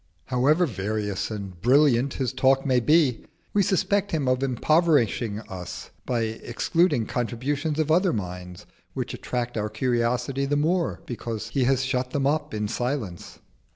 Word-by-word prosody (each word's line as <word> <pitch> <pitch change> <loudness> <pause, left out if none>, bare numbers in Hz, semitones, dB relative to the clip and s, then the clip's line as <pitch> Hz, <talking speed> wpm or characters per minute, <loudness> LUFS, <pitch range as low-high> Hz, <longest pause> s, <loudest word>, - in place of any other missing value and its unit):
However 145 +8 +3
various 105 - -2
and 100 -5 -7
brilliant 135 +1 +4
his 130 -2 -2
talk 135 +1 +3
may 130 -2 +3
be, 145 0 +3 0.3
we 205 - +4
suspect 200 +1 +1
him 150 -5 -1
of 130 0 +2
impoverishing 130 - +2
us 90 -5 -8 0.2
by 120 -2 0
excluding 120 +5 0
the - - -9
contributions 135 +6 -1
of 155 -1 +1
other 180 +2 +4
minds, 90 -3 -6 0.3
which - - -3
attract 120 -1 -3
our 105 0 -2
curiosity 125 +4 0
the 145 - +1
more 165 +3 0
because 115 -2 -5
he 130 +2 +1
has 130 0 +2
shut 130 -1 -1
them 140 -2 0
up 150 +3 0
in 105 -1 -2
silence. 120 -5 -4
125 Hz, 155 wpm, -25 LUFS, 110-145 Hz, 0.3 s, brilliant